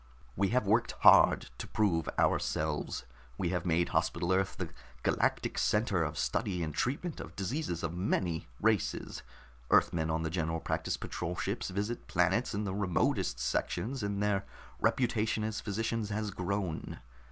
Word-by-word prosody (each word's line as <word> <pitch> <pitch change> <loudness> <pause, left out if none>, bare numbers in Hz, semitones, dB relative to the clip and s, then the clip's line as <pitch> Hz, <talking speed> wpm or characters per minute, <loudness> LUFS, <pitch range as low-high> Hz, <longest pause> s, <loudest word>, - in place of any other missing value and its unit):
We 100 +2 +2
have 125 +2 +1
worked 115 +4 +2
hard - - +7
to - - -5
prove 90 -7 +1
ourselves. 75 -1 0 0.3
We 90 - 0
have 90 0 -1
made 85 +1 +2
Hospital 90 +1 +1
Earth 95 0 0
the - - -4 0.3
galactic - - +1
center 105 -5 +2
of 75 0 -3
study 90 -4 0
and 75 -1 -3
treatment 145 - -2
of - - -8
diseases 100 - -2
of 85 0 -2
many 90 -2 -1
races. 110 -3 0 0.5
Earthmen 80 -1 +3
on 80 0 0
the 80 - -2
General 80 -1 -1
Practice - - -2
Patrol 90 +1 -4
ships 100 +4 -2
visit 105 +5 -3
planets 95 +7 +2
in 105 - -1
the 95 -2 -2
remotest 90 -10 0
sections, 120 - -1
and 100 0 -1
their 100 -1 +1 0.4
reputation 110 -3 +1
as 110 0 -2
physicians 110 +1 -2
has 105 0 -2
grown. 90 -2 -3
95 Hz, 150 wpm, -32 LUFS, 85-110 Hz, 0.5 s, hard